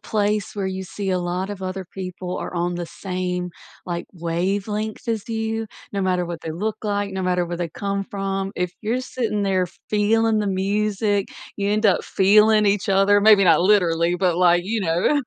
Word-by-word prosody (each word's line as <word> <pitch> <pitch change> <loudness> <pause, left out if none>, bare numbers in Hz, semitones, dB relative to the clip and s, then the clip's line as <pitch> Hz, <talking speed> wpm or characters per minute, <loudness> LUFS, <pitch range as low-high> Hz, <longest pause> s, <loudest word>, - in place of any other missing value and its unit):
place 210 -1 -1
where 195 -2 -1
you 190 0 -3
see 195 +1 -4
a 185 - +1
lot 180 +2 -2
of 200 -2 -6
other 185 0 -4
people 185 -1 -5
are - - -5
on 175 0 -1
the 175 -1 -4
same, 180 0 -3 0.4
like, 170 -1 -3
wavelength 195 +5 -2
as 225 -1 -2
you, 225 0 -2 0.3
no 200 -1 -1
matter 180 -1 +1
what 170 -1 -6
they 160 - -5
look 210 +7 -2
like, 205 -2 -1
no 190 -1 -3
matter 180 -1 +1
where 175 - -4
they 170 -1 -3
come 200 +4 -3
from, 195 -1 -3
if 180 0 -1
you're 230 +4 0
sitting 225 -5 -2
there 185 -2 +1 0.2
feeling 215 +1 +2
the 205 - -1
music, 205 +1 0 0.3
you 200 0 -1
end 215 +1 +2
up 195 - +3
feeling 210 +2 +4
each 205 0 +1
other 195 +1 +4
maybe 205 -1 +6
not 165 -2 +5
literally, 175 -3 +3
but, 180 -2 +1
like, 175 -1 +4
you 220 +3 -1
know, 185 - +1
195 Hz, 195 wpm, -22 LUFS, 180-210 Hz, 0.4 s, maybe